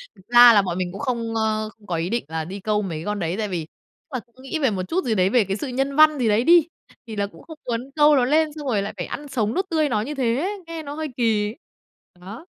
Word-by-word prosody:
Thực 190 Hz, -, -21 dB
ra 240 Hz, 0 st, +8 dB
là 205 Hz, -, +6 dB
bọn 180 Hz, -2 st, -3 dB
mình 180 Hz, -1 st, -2 dB
cũng 195 Hz, -, -8 dB
không, 235 Hz, -4 st, -2 dB
ơ, 215 Hz, -1 st, 0 dB
không 205 Hz, -, -21 dB
có 175 Hz, -, -2 dB
ý 165 Hz, +2 st, -2 dB
định 235 Hz, +1 st, -2 dB
là 160 Hz, 0 st, -4 dB
đi 195 Hz, +4 st, -7 dB
câu 210 Hz, +1 st, 0 dB
mấy 175 Hz, -6 st, -4 dB
cái 160 Hz, -, -7 dB
con 210 Hz, 0 st, -2 dB
đấy 170 Hz, 0 st, -2 dB
tại 220 Hz, -1 st, -1 dB
vì 175 Hz, -5 st, -3 dB
tức 160 Hz, -, -40 dB
là -, -, -3 dB
cũng 235 Hz, +1 st, -21 dB
nghĩ 290 Hz, +4 st, -3 dB
về 265 Hz, -6 st, +2 dB
một 185 Hz, -2 st, -2 dB
chút 370 Hz, +3 st, -1 dB
gì 225 Hz, -, +1 dB
đấy, 185 Hz, -1 st, +3 dB
về 240 Hz, +1 st, +4 dB
cái 195 Hz, +1 st, -3 dB
sự 285 Hz, -, -5 dB
nhân 270 Hz, +2 st, -2 dB
văn 310 Hz, -1 st, +6 dB
gì 240 Hz, -, +1 dB
đấy 210 Hz, +3 st, +3 dB
đi, 335 Hz, +2 st, +6 dB, 0.4 s
thì 220 Hz, -, -6 dB
là 200 Hz, -1 st, -1 dB
cũng -, -, -16 dB
không 320 Hz, -2 st, -11 dB
muốn 240 Hz, +2 st, -3 dB
câu 300 Hz, 0 st, +6 dB
ló 255 Hz, -3 st, +3 dB
lên 310 Hz, +4 st, +3 dB
xong 295 Hz, -3 st, -7 dB
rồi 210 Hz, -5 st, +1 dB
lại 200 Hz, -, -5 dB
phải 175 Hz, -, -3 dB
ăn 290 Hz, 0 st, -7 dB
sống 225 Hz, -5 st, -1 dB
nuốt 380 Hz, -, 0 dB
tươi 310 Hz, -3 st, +1 dB
nó 215 Hz, -4 st, 0 dB
như 285 Hz, +7 st, -5 dB
thế, 275 Hz, -, -1 dB
nghe 330 Hz, -1 st, -6 dB
nó 285 Hz, -1 st, -7 dB
hơi 310 Hz, +1 st, -4 dB
kỳ. 220 Hz, -2 st, +1 dB, 0.6 s
Đó. 205 Hz, -, -10 dB
230 Hz, 295 wpm, -23 LUFS, 200-285 Hz, 0.6 s, ra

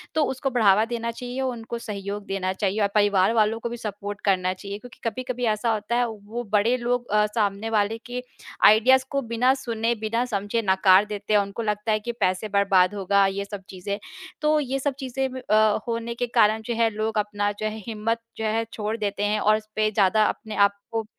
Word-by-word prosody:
तो 315 Hz, -, +3 dB
उसको 265 Hz, +1 st, -2 dB
बढ़ावा 215 Hz, -3 st, +4 dB
देना 235 Hz, 0 st, -3 dB
चाहिए, 250 Hz, +2 st, -5 dB
उनको 235 Hz, -3 st, -3 dB
सहयोग 200 Hz, -1 st, -5 dB
देना 190 Hz, -1 st, -2 dB
चाहिए। 200 Hz, +2 st, -1 dB
और 200 Hz, -, +4 dB
परिवार 205 Hz, 0 st, +3 dB
वालों 220 Hz, 0 st, +2 dB
को 235 Hz, -, -4 dB
भी 240 Hz, -, -5 dB
सपोर्ट 205 Hz, -2 st, -6 dB
करना 185 Hz, -2 st, +2 dB
चाहिए 200 Hz, +1 st, -7 dB
क्योंकि 245 Hz, 0 st, -14 dB
कभी-कभी 250 Hz, 0 st, -4 dB
ऐसा 230 Hz, +2 st, 0 dB
होता 215 Hz, +2 st, -2 dB
है, 245 Hz, 0 st, +2 dB
वो 220 Hz, -2 st, -8 dB, 0.2 s
वो 240 Hz, -, -1 dB
बड़े 220 Hz, +4 st, +3 dB
लोग 245 Hz, 0 st, -1 dB
अ, 210 Hz, 0 st, +4 dB
सामने 205 Hz, 0 st, 0 dB
वाले 215 Hz, 0 st, +1 dB
की 250 Hz, +1 st, -5 dB, 0.4 s
आइडियाज़ 260 Hz, +5 st, +6 dB
को 275 Hz, 0 st, 0 dB
बिना 250 Hz, +3 st, +4 dB
सुने, 235 Hz, -3 st, -1 dB
बिना 225 Hz, +3 st, -1 dB
समझे 205 Hz, 0 st, -1 dB
नकार 190 Hz, +1 st, +5 dB
देते 210 Hz, 0 st, -4 dB
हैं। 210 Hz, -, +6 dB
उनको 200 Hz, +3 st, -5 dB
लगता 210 Hz, +1 st, -1 dB
है 215 Hz, -, +2 dB
कि 240 Hz, -, -1 dB
पैसे 185 Hz, +2 st, 0 dB
बर्बाद 195 Hz, -1 st, +3 dB
होगा, 200 Hz, 0 st, +3 dB
ये 200 Hz, +1 st, -3 dB
सब 200 Hz, -1 st, -8 dB
चीज़ें। 195 Hz, +2 st, -4 dB, 0.4 s
तो 305 Hz, 0 st, +3 dB
ये 270 Hz, -1 st, -2 dB
सब 280 Hz, 0 st, -1 dB
चीज़ें 265 Hz, 0 st, -2 dB
ब 260 Hz, -, -5 dB
अ, 215 Hz, 0 st, +4 dB
होने 230 Hz, 0 st, -3 dB
के 245 Hz, +1 st, -2 dB
कारण 220 Hz, -2 st, +3 dB
जो 235 Hz, -, -2 dB
है 230 Hz, 0 st, +3 dB
लोग 215 Hz, 0 st, -3 dB
अपना 205 Hz, 0 st, 0 dB
जो 215 Hz, -, -2 dB
है 215 Hz, 0 st, -2 dB
हिम्मत 225 Hz, +1 st, -1 dB, 0.2 s
जो 220 Hz, -, -4 dB
है 225 Hz, +1 st, +1 dB
छोड़ 215 Hz, +1 st, -2 dB
देते 205 Hz, -1 st, -2 dB
हैं, 210 Hz, +1 st, +1 dB
और 215 Hz, +1 st, +4 dB
इसपे 215 Hz, 0 st, -1 dB
ज़्यादा 210 Hz, +1 st, +3 dB
अपने 220 Hz, -1 st, -3 dB
आप 200 Hz, 0 st, +4 dB, 0.2 s
को 225 Hz, -, 0 dB
अ, 220 Hz, -, -13 dB
215 Hz, 220 wpm, -24 LUFS, 205-235 Hz, 0.4 s, आइडियाज़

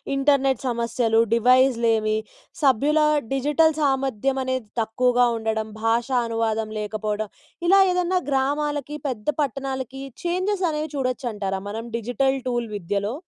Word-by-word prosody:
Internet 275 Hz, -1 st, +2 dB
సమస్యలు, 235 Hz, -1 st, +1 dB
డివైస్లేమి, 235 Hz, -3 st, +3 dB, 0.5 s
సభ్యుల 285 Hz, +4 st, +3 dB, 0.3 s
digital 295 Hz, +4 st, +3 dB
సామర్థ్యం 270 Hz, -2 st, 0 dB
అనేది 260 Hz, -3 st, -2 dB
తక్కువగా 245 Hz, +2 st, +2 dB
ఉండడం, 220 Hz, -1 st, -2 dB
భాషా 235 Hz, +3 st, +1 dB
అనువాదం 225 Hz, -1 st, -1 dB
లేకపోవడం. 210 Hz, 0 st, -3 dB, 0.4 s
ఇలా 390 Hz, +2 st, +6 dB
ఏదన్నా 360 Hz, 0 st, +1 dB
గ్రామాలకి, 290 Hz, +2 st, -1 dB
పెద్ద 220 Hz, -5 st, -6 dB
పట్టణాలకి 270 Hz, -1 st, -3 dB, 0.2 s
చేంజెస్ 370 Hz, +2 st, 0 dB
అనేవి 305 Hz, 0 st, -3 dB
చూడొచ్చంటార 240 Hz, -7 st, -2 dB
మనం 225 Hz, +3 st, -5 dB
డిజిటల్ 265 Hz, +4 st, 0 dB
టూల్ 240 Hz, -2 st, -1 dB
విద్యలో? 200 Hz, +4 st, -2 dB
255 Hz, 110 wpm, -23 LUFS, 225-275 Hz, 0.5 s, ఇలా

